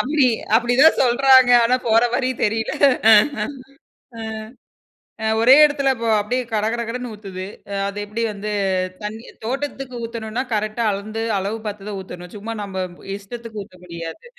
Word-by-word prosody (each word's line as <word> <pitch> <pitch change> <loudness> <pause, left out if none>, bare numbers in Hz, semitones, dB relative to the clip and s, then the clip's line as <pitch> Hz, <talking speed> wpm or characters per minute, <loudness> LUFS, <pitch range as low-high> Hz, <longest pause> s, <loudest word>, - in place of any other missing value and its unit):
அப்டி, 285 0 +2 0.3
அப்டிதான் 245 +6 +4
சொல்றாங்க. 260 0 +5
ஆனா 250 +2 +3
போற 225 +1 +5
மாரி 255 +1 +1 0.2
தெரியல. 225 +1 -1 1.5
ஆ, - - -8 1.0
அ 220 - -1
ஒரே 250 +3 +7
எடத்துல 280 -2 +2
அப்போ, 230 -2 -5
அப்டியே 250 +5 -2
கடகடகடன்னு 235 +3 -2
ஊத்துது. 190 -3 -7 0.4
அது 200 +1 -5
எப்டி 210 +3 -4
வந்து, 210 +1 -5 0.5
தண்ணி 220 +3 -6 0.2
தோட்டத்துக்கு 270 0 -4
ஊத்தணுனா, 230 +1 -4
கரெக்ட்டா 215 +2 -1
அளந்து, 215 +3 -4 0.2
அளவு 200 +4 -3
பார்த்ததுதான் 205 -1 -5
ஊத்தனும். 180 -1 -10
சும்மா 225 +3 -6
நம்ம, 190 -2 -4 0.3
இஷ்டத்துக்கு 220 +2 -8
ஊத்த 185 - -20
முடியாது. 170 - -8
225 Hz, 130 wpm, -21 LUFS, 205-250 Hz, 1.5 s, ஒரே